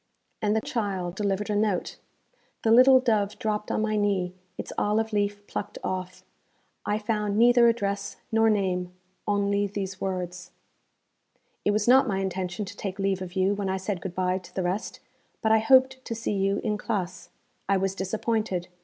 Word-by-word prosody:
And 210 0 +1
the 220 - +2
child 195 -8 -2
delivered 200 +1 -1
a - - 0
note. 205 -3 0 0.7
The 225 - +3
little 255 +3 +8
dove 215 -5 +1
dropped 210 -1 -2
on 215 - 0
my 215 0 0
knee, 195 -4 0 0.2
its - - -6
olive 220 +1 0
leaf 205 0 -1
plucked 205 - -5
off. 185 0 -4 0.6
I 210 - +1
found 210 -1 -1
neither 240 +1 +6
address 200 -3 -1
nor 225 0 +4
name, 180 -4 0 0.3
only 200 0 +1
these 195 -1 -5
words, 180 -1 -4 1.1
'It - - +2
was 210 +1 +1
not 260 +2 +6
my 195 -3 0
intention 190 +1 -2
to 200 - -9
take 195 -2 -5
leave 195 -1 0
of 180 -1 -6
you 190 +1 +2
when 200 -1 -2
I 190 - 0
said 190 -1 -3
good 180 -2 -6
bye 185 0 0
to 180 - -16
the 190 - -1
rest, 185 +5 -3 0.4
but 220 - +1
I 220 - +6
hoped 260 +3 +4
to 230 - -4
see 225 -1 -2
you 195 0 +1
in 210 -1 -1
classe. 190 -5 -3 0.4
I 195 - +4
was 190 0 0
disappointed. 195 -1 -2
205 Hz, 180 wpm, -26 LUFS, 190-220 Hz, 1.1 s, little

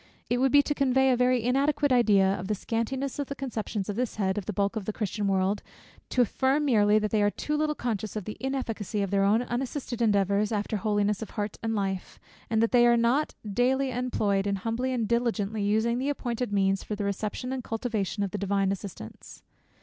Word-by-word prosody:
It 245 - +2
would 265 0 +3
be 285 0 +6
to 295 - -1
convey 265 -1 +3
a - - +4
very 250 -1 +2
inadequate 280 +3 +2
idea 215 -6 +5
of 185 -1 -5
the 210 - 0
scantiness 250 +7 -3
of 285 - -2
the 280 - -5
conceptions 225 -6 -4
on 205 - -3
this 245 +1 -2
head, 190 -3 0
of 205 -3 -4
the - - -1
bulk 200 +2 0
of 215 -3 -3
the 215 - -3
Christian 210 -1 -2
world, 195 +1 +1 0.5
to 250 - +2
affirm 265 +6 +1
merely, 210 -5 +4
that 215 -1 0
they 215 - +2
are 205 - +4
too 300 +8 -3
little 300 0 0
conscious 220 -5 -3
of 210 -4 -4
the 215 - -5
inefficacy 225 -6 -2
of 195 - -3
their 200 -1 +3
own 215 +4 +3
unassisted 245 0 -4
endeavours 205 -1 +2
after 210 0 -1
holiness 205 0 0
of 220 - -5
heart 205 -1 -2
and 225 0 -1
life, 195 -2 -3 0.3
and 225 0 +2
that 230 - +1
they 240 -1 +6
are 235 0 +5
not 240 +6 +1
daily 255 +6 +1
employed 215 -5 0
in 200 - +1
humbly 230 +6 -2
and 235 -4 -1
diligently 220 -3 0
using 220 +4 +1
the 270 +2 -1
appointed 245 -5 -2
means 195 -1 +1
for 210 - -4
the 205 - -3
reception 210 +6 -3
and 260 -2 -4
cultivation 220 -3 -2
of 195 - -3
the 205 - -4
divine 195 0 +1
assistance. 190 - -8
220 Hz, 220 wpm, -27 LUFS, 205-250 Hz, 0.5 s, be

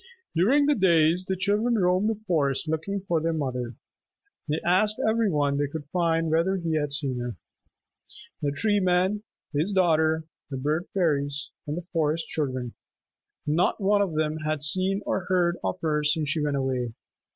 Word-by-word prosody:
During 255 - +4
the 295 - +4
days 175 - +3
the 190 - 0
children 210 +5 +1
roamed 185 +2 +2
the 225 - 0
forest 145 -5 0
looking 160 +6 -2
for 165 -2 +1
their 165 +1 0
mother. 125 -6 -3 0.7
They 150 +2 0
asked 210 +5 +3
every 220 -1 +2
one 145 -3 +1
they 145 - +1
could 145 +1 -6
find 165 -2 +1
whether 170 +4 +2
he 170 -3 -2
had 145 -2 0
seen 140 -3 -2
her. 120 -2 -4 1.1
The 145 - 0
Tree 205 +7 +1
Man, 185 +2 +2 0.3
his 160 +8 0
daughter, 160 -3 +3 0.3
the 135 - -4
Bird 150 +6 -1
Fairies, 145 -5 0 0.2
and 150 +2 -3
the 175 - -6
Forest 160 0 +1
Children, 130 -5 -3 0.7
not 155 +4 +1
one 200 0 +3
of 185 -6 -1
them 155 0 0
had 155 -1 -2
seen 190 +6 +1
or 190 -1 -1
heard 180 -2 +2
of 95 -1 -2
her 150 -2 0
since 150 0 +1
she 160 - 0
went 145 -1 0
away. 130 -3 -1
160 Hz, 175 wpm, -26 LUFS, 145-185 Hz, 1.1 s, During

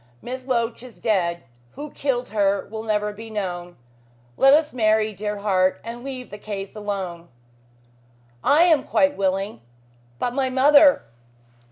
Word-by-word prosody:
Miss 255 - -7
Loach 235 -3 -1
is 250 -1 -13
dead. 175 -6 0 0.3
Who 295 0 -8
killed 255 -3 -2
her 200 -2 +1
will 220 0 -5
never 210 -1 -1
be 225 +2 -10
known. 180 -4 -5 0.6
Let 270 - +5
us 305 0 +1
marry, 215 -2 +2
dear 210 +1 -4
heart, 190 -2 +1
and 235 +1 -7
leave 260 -2 -7
the 205 - -8
case 200 -1 -6
alone." 190 -5 -5 1.1
"I 300 +4 +5
am 325 -5 +4
quite 285 -1 +2
willing. 195 - -1 0.6
But 245 - -2
my 265 0 0
mother?" 285 +2 +5
220 Hz, 145 wpm, -23 LUFS, 195-255 Hz, 1.1 s, Let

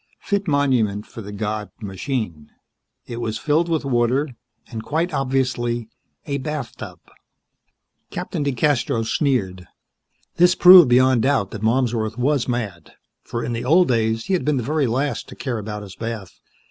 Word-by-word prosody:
Fit 200 -1 -2
monument 125 -9 +1
for 115 - -10
the 105 -1 -8
god, 105 0 -3
machine. 100 - -4 0.6
It 120 0 -6
was 110 -1 -2
filled 160 +5 +1
with 160 -3 0
water, 130 +3 +1 0.4
and 115 -3 -7
quite 160 +5 -1
obviously 125 -4 -1 0.4
a 140 -1 -2
bathtub. 145 -4 -6 1.1
Captain - - -4
DeCastros 125 -4 0
sneered. 95 - -1 0.7
This 180 +1 +5
proved 180 -6 +9
beyond 130 0 +4
doubt 130 -7 +1
that 110 - -7
Malmsworth 115 -1 0
was 135 +1 +1
mad, 110 -9 -4 0.3
for 115 - -4
in 120 - -3
the 115 - -3
old 170 +6 +4
days 115 -1 +1
he 195 - -1
had 185 - +1
been 150 -2 +1
the 125 - -1
very 150 +1 0
last 135 +5 -2
to - - -10
care 125 -5 -3
about 105 0 -6
his 95 -2 -11
bath. 115 -4 -6
120 Hz, 155 wpm, -21 LUFS, 110-145 Hz, 1.1 s, proved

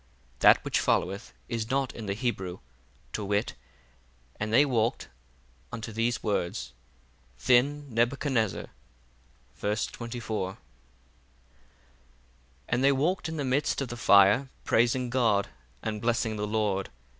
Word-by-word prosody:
That - - +6
which - - +1
followeth 100 +4 0 0.2
is 115 -1 -3
not 135 -1 0
in 110 -3 -7
the 100 - -1
Hebrew, 95 -6 -2 0.6
to 105 - -3
wit, 100 +2 0 0.9
And 105 0 -2
they 135 +6 +6
walked—unto 65 - -4
these 115 +2 -1
words. 85 - -2 0.7
Then 140 +4 +3
Nebuchadnezzar—verse 65 - -3
24. 115 -5 -4
1 - - -19 2.1
And 120 +2 +1
they 140 - +6
walked 160 +5 0
in 160 - -5
the 145 - -2
midst 135 +3 +1
of 135 -3 -3
the 120 - -5
fire, 105 +3 +5
praising 120 +1 +2
God, 115 -6 +2 0.3
and 105 -1 -3
blessing 115 -1 0
the 105 0 -2
Lord. 105 -3 0
110 Hz, 120 wpm, -28 LUFS, 100-125 Hz, 2.1 s, That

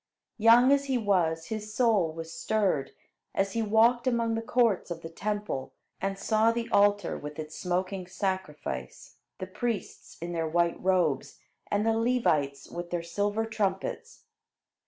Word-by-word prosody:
Young 235 +4 +7
as 280 0 +3
he 265 -2 +1
was, 175 -7 +1
his 215 -1 -5
soul 220 -9 +3
was 165 0 -7
stirred, 190 -11 0 0.5
as 195 0 +1
he 230 - -1
walked 230 +3 +3
among 230 -2 +1
the 225 - -1
courts 230 -5 +1
of 170 -1 -6
the 165 - -7
Temple 205 -7 -3 0.3
and 195 0 -1
saw 220 +2 +3
the 230 0 -3
altar 205 -2 +3
with 150 0 -8
its 155 0 -6
smoking 185 +1 -2
sacrifice, 180 - -4 0.2
the 185 - -5
priests 225 +4 -4
in 170 +1 -5
their 165 -1 -1
white 170 +1 +1
robes, 180 -6 +1 0.3
and 205 +1 +1
the 225 - +3
Levites 160 - +1
with 175 0 -6
their 175 -1 -2
silver 205 +6 -1
trumpets. 215 - -3
195 Hz, 155 wpm, -28 LUFS, 170-225 Hz, 0.5 s, Young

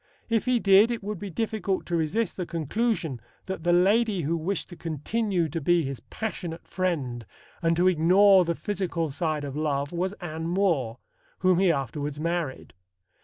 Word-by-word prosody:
If 225 -2 +1
he 250 -1 +2
did, 200 +2 +6
it 235 -4 -3
would 205 -2 -4
be 205 - -5
difficult 210 0 -2
to 175 - -2
resist 170 +6 0
the 180 -2 -4
conclusion 165 - -1 0.2
that 190 -4 -5
the 175 - +2
lady 200 +3 +3
who 160 +4 0
wished 170 +5 -2
to 175 - -9
continue 175 +4 -1
to 165 +3 -3
be 175 +3 +3
his 135 -2 -4
passionate 180 -7 -6
friend 145 -11 -2 0.4
and 165 -1 +2
to 180 +1 +4
ignore 185 +3 +6
the 170 -1 -1
physical 170 -6 -2
side 155 0 -2
of 140 -1 -5
love 145 -2 -1
was 180 +3 -2
Anne 160 -4 -5
More, 170 - +1 0.4
whom 185 -1 +4
he 190 -2 +4
afterwards 145 +1 -3
married. 165 -4 -3
175 Hz, 170 wpm, -26 LUFS, 155-195 Hz, 0.4 s, did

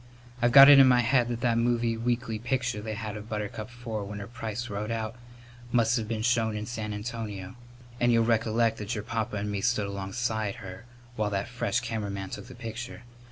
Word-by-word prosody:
I've 120 0 +4
got 135 +2 +11
it 145 -1 +10
in 135 - +8
my 125 -1 +5
head 120 0 +3
that 120 -1 -3
that 120 -1 +2
movie 115 -1 +1
weekly 115 -1 -1
picture 120 -2 -1
they 110 0 -4
had 110 -1 -5
of 105 +1 -8
Buttercup 105 +1 -4
Four 120 -3 -5
with 105 +1 -6
her 100 - -6
price 115 +1 -5
wrote 105 0 -4
out 115 0 -3 0.6
must 115 -1 +3
have 110 -3 -1
been 110 -1 -2
shown 115 -3 +2
in 105 - -4
San 110 -2 -4
Antonio. 105 -3 -5 0.5
And 120 0 +3
you'll 115 -1 +4
recollect 115 0 +2
that 105 +3 -3
your 105 - -4
papa 115 0 -3
and 105 0 -2
me 100 -1 -2
stood 110 -2 +1
alongside 100 +2 -2
her 95 +3 -9 0.3
while 105 -1 0
that 100 0 -2
fresh 120 -3 -1
cameraman 100 -5 -4
took - - -7
the 130 - -11
picture. 120 0 -7
115 Hz, 205 wpm, -28 LUFS, 105-120 Hz, 0.6 s, got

